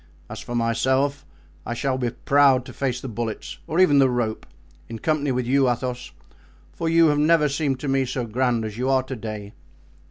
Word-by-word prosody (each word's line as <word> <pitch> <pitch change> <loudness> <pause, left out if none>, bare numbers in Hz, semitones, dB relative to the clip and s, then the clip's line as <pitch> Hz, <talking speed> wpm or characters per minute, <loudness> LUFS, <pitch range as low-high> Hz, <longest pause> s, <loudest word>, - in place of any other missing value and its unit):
As 105 - -6
for 120 - -6
myself, 130 +5 0 0.4
I 120 - -4
shall 130 +1 -1
be 125 -2 0
proud 135 +1 +3
to - - -10
face 130 -3 -2
the 135 - -7
bullets, 115 -1 -5
or 160 - -1
even 145 -7 +5
the 135 -1 +5
rope, 120 -3 -2 0.4
in 115 - -6
company 145 +2 0
with 125 -1 -1
you, 135 +1 +3
Athos; 125 0 -3 0.6
for 165 - -2
you 165 -1 +5
have 145 0 +1
never 155 0 +4
seemed 140 -2 -1
to 145 - -4
me 135 -1 +1
so 125 -1 -3
grand 120 0 0
as 110 +1 -7
you 130 +1 0
are 130 -1 +3
to 130 +1 -6
day." 105 -3 -7
130 Hz, 200 wpm, -23 LUFS, 120-140 Hz, 0.6 s, even